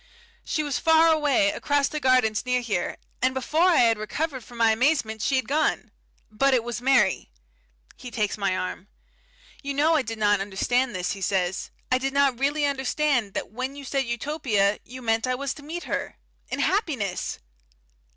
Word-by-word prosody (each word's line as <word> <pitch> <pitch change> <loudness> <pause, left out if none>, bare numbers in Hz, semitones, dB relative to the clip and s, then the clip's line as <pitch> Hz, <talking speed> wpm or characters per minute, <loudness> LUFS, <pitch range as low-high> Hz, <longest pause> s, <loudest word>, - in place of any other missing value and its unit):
She 310 - -1
was 290 -3 -2
far 325 0 +5
away 300 -1 +3
across 285 -2 +1
those 305 - -4
gardens 255 -5 +3
near 250 0 0
here 210 -7 -2 0.2
and 260 +1 +1
before 310 +7 +2
I 350 - +4
had 225 -2 +3
recovered 260 +4 -3
from 240 +1 -13
my 225 -1 +4
amazement 225 -2 +1
she 270 - +1
had 260 -4 0
gone! 305 +3 0 0.4
But 265 +5 +3
it 240 - +1
was 240 -1 -5
Mary." 245 - +2 0.7
He 250 - -9
takes 215 -3 -1
my 195 -3 -1
arm. 185 +1 -5 0.7
"You 280 -1 -4
know 305 +3 +3
I 310 - +3
did 225 -2 -6
not 205 -1 +3
understand 240 +5 0
this," 180 -1 -2
he 200 - -6
says. 185 -1 -1 0.2
"I 255 - +3
did 270 +1 -2
not 275 -3 +2
really 290 +2 +1
understand 270 -5 0
that - - -4
when 255 +4 -4
you 285 -1 -9
said 270 0 -1
Utopia, 235 -5 0
you 255 +1 -10
meant 225 +1 +1
I 255 - 0
was 275 +1 -3
to - - -13
meet 335 +4 -6
her - - -4 0.3
in - - -3
happiness." 280 - -1
255 Hz, 185 wpm, -25 LUFS, 220-285 Hz, 0.7 s, far